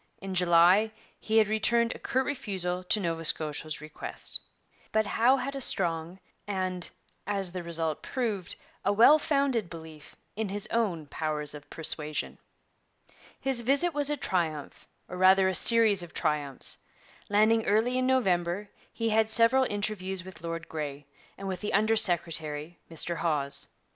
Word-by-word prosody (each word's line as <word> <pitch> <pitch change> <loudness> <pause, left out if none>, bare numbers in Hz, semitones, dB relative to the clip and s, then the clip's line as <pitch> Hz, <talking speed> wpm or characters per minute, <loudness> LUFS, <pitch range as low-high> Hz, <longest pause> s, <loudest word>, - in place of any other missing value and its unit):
In 195 -1 -6
July 180 +4 +4 0.3
he 220 +1 0
had 220 -2 +5
returned 230 +2 +1
a - - -11
curt 260 +1 -1
refusal 190 -10 -3
to 210 - +1
Nova 165 -3 -3
Scotia's 155 -1 -2
request. 155 0 -2 0.5
But 220 0 +2
Howe 240 +6 +3
had 275 +2 -4
a 275 - -4
strong 170 -4 +1 0.3
and, 185 -3 -3 0.4
as 195 -3 -2
the 180 0 -5
result 165 -2 -2
proved, 215 -9 -3 0.3
a 200 - +2
well 240 +9 +6
founded 275 - 0
belief 160 -2 -11 0.2
in 215 -1 -3
his 205 +1 -2
own 195 -9 -1
powers 150 0 -3
of 145 -1 -12
persuasion. 155 -1 -2 1.0
His 265 -3 +1
visit 280 +8 +2
was 290 -1 +1
a 295 - -1
triumph, 165 - -3 0.2
or 180 - -7
rather 190 +1 +5
a 190 - 0
series 220 -1 +5
of 175 -2 -10
triumphs. 150 -4 -3 0.5
Landing 215 +2 +3
early 230 +5 +2
in 255 - 0
November, 195 -6 0 0.2
he 230 -1 -2
had 220 0 +2
several 230 +4 +7
interviews 205 -3 -3
with 185 -3 -11
Lord 165 0 -5
Grey, 145 -2 -6 0.3
and 195 - -7
with 185 -1 -4
the 210 - -3
under 215 +2 +3
secretary, 165 -5 -1
Mr 165 +1 -1
Hawes. 150 -4 0
190 Hz, 155 wpm, -28 LUFS, 165-225 Hz, 1.0 s, several